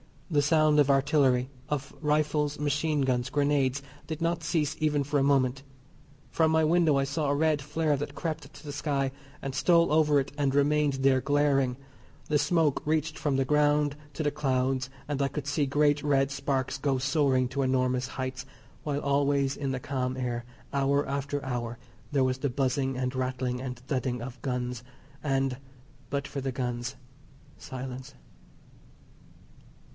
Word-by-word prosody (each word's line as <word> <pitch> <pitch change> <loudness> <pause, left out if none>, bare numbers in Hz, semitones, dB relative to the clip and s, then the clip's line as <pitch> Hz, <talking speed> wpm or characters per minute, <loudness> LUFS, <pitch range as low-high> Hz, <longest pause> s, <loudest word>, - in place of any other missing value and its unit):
The 145 -2 +4
sound 155 0 +4
of 145 -1 +4
artillery, 135 -2 +3 0.2
of 140 -2 -3
rifles, 150 -1 +1
machine 150 +1 0
guns, 130 -1 0
grenades, 140 -1 +1 0.2
did 160 -1 -4
not 170 0 0
cease 155 -2 0
even 150 -2 +1
for 145 +1 0
a - - +2
moment. 135 -2 +2 0.7
From 160 -1 +3
my 160 0 +3
window 160 -2 +4
I 135 - +2
saw 140 +2 -1
a 140 - +2
red 155 -1 +2
flare 150 +1 0
that 145 +2 -5
crept 155 -4 -4
to - - -14
the 145 - -5
sky, 140 -2 -1 0.3
and 135 -1 -3
stole 170 +2 +4
over 150 -2 +4
it 135 - -3
and 140 -2 +1
remained 145 0 +3
there 135 -1 +3
glaring; 140 -3 +2 0.5
the 150 - +3
smoke 160 -4 +2
reached 155 +1 0
from 145 -3 0
the 135 0 +1
ground 150 0 +3 0.2
to 155 - -3
the 145 - +1
clouds, 130 -2 0 0.2
and 145 -1 -2
I 140 - +3
could 140 +1 -5
see 145 +1 +1
great 145 +1 +3
red 135 -1 +2
sparks 140 -1 -1
go 135 -1 +1
soaring 135 -1 +2
to 140 +1 -2
enormous 130 -1 +1
heights; 130 0 -5 0.4
while 145 -1 -2
always, 140 -1 +1
in 140 -2 -2
the 130 -1 -3
calm 130 -2 -2
air, 120 -2 -3 0.3
hour 140 +1 +2
after 140 +1 -2
hour 120 -2 -3 0.3
there 140 -2 +3
was 130 0 +1
the 140 - 0
buzzing 135 +1 0
and 125 0 -1
rattling 130 -1 -2
and 125 -2 -5
thudding 130 -1 -2
of 125 0 -8
guns, 125 -2 -2 0.4
and, 135 -3 0 0.5
but 140 0 -2
for 140 - -5
the 135 -1 -3
guns, 125 0 -3 0.6
silence. 130 +1 -7
140 Hz, 165 wpm, -28 LUFS, 130-150 Hz, 0.7 s, The